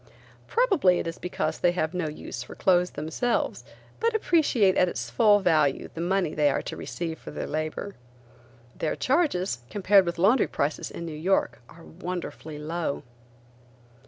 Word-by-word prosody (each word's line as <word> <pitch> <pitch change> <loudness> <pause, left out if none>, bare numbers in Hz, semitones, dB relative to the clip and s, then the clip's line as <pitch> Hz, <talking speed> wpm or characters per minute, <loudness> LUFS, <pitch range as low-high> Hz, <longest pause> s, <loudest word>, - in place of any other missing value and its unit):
Probably 390 - +3
it - - -2
is 165 0 -5
because 160 -3 -2
they 175 0 +3
have 160 -2 -1
no 180 -3 -1
use 150 - -6
for - - -9
clothes 180 -1 +3
themselves, 160 +11 -1 0.4
but 460 0 +1
appreciate 285 - +3
at 180 - +3
its 120 -6 -5
full 205 - +5
value 155 -6 +2
the 165 - -5
money 180 -2 0
they 150 -1 +3
are 135 - -1
to - - -5
receive 165 -2 -5
for - - -10
their - - -5
labor. 155 +6 -3 0.8
Their 160 - -2
charges, 255 - +1
compared 195 -2 +4
with 170 - -2
laundry 210 +9 +4
prices 145 +2 -2
in 170 - -7
New 165 - -5
York, 170 0 0
are 165 +1 -15
wonderfully 170 -3 -6
low. 155 0 -3
175 Hz, 160 wpm, -26 LUFS, 155-195 Hz, 0.8 s, full